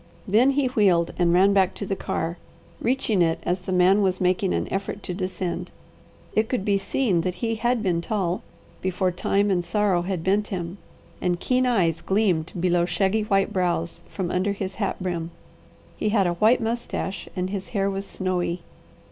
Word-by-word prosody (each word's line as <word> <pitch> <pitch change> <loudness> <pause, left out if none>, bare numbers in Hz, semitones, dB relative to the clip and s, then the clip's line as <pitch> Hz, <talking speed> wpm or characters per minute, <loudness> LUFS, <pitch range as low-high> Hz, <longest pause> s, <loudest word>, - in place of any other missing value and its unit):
Then 225 +7 +5
he 285 - +3
wheeled 195 -9 +2
and 175 -1 +4
ran 190 +3 +5
back 190 -2 +3
to 200 - -4
the 195 - -1
car, 170 -2 -3 0.4
reaching 230 -6 +1
it 165 -1 +3
as 180 +1 0
the 185 +1 -6
man 185 +3 +4
was 185 -2 +1
making 185 +1 +1
an - - -1
effort 200 +1 -3
to 180 - -4
descend. 185 -1 -3 0.7
It 215 +1 +2
could 245 -7 -1
be 200 -1 +2
seen 195 -4 +1
that 180 +1 -2
he 225 +2 -1
had 240 +1 0
been 175 -4 +1
tall, 185 -2 -1 0.4
before 185 0 0
time 200 +3 +1
and 175 -2 +1
sorrow 185 0 +1
had 180 -2 -3
bent 205 +3 +2
him, 180 0 -5 0.4
and 175 -1 0
keen 255 +4 +1
eyes 175 -9 +2
gleamed 190 -6 +1
below 175 -1 +2
shaggy 190 +5 +1
white 195 -2 +1
brows 175 -2 -1
from 185 -3 -3
under 190 +2 +1
his 195 -1 -4
hat 195 - 0
brim. 170 -3 -2 0.7
He 215 - 0
had 205 -3 +3
a 175 - +1
white 220 +8 +4
moustache, 225 -4 -3
and 185 0 -2
his 195 -2 -4
hair 195 -3 0
was 195 0 -2
snowy. 180 -2 -2
190 Hz, 185 wpm, -24 LUFS, 175-205 Hz, 0.7 s, Then